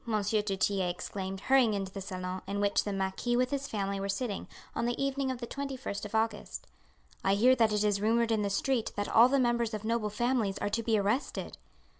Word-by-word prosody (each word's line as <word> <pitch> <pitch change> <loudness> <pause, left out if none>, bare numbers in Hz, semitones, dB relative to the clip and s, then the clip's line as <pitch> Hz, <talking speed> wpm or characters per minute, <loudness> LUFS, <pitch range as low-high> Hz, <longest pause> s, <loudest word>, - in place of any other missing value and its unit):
du 215 -1 +1 0.2
Tillet 190 -1 +1
exclaimed, 190 +2 -5
hurrying 255 -4 +4
into 195 -1 -3
the 195 - -6
salon, 185 -1 -5
in 200 +1 -2
which 205 0 +2
the 205 - -2
marquis 195 +5 -1
with 250 +1 +1
his 280 0 -2
family 200 -4 -2
were 195 0 -3
sitting, 200 0 -2 0.3
on 235 - -1
the 240 - -2
evening 275 0 0
of 260 - -2
the 240 - -5
21st 270 -6 -5
of 210 - -6
August, 220 -1 -1 0.6
"I 195 +1 +3
hear 250 +5 +5
that 225 -2 +4
it 210 0 +1
is 205 -1 +1
rumoured 230 +2 +2
in 220 -1 +2
the 200 - 0
street 230 +4 0
that 205 0 -2
all 235 +3 +6
the 275 - +3
members 235 -3 +1
of 210 - -6
noble 225 -1 0
families 225 -2 0
are - - -1
to 230 +3 0
be 225 -1 +2
arrested." 210 +7 -1
215 Hz, 220 wpm, -30 LUFS, 200-240 Hz, 0.6 s, all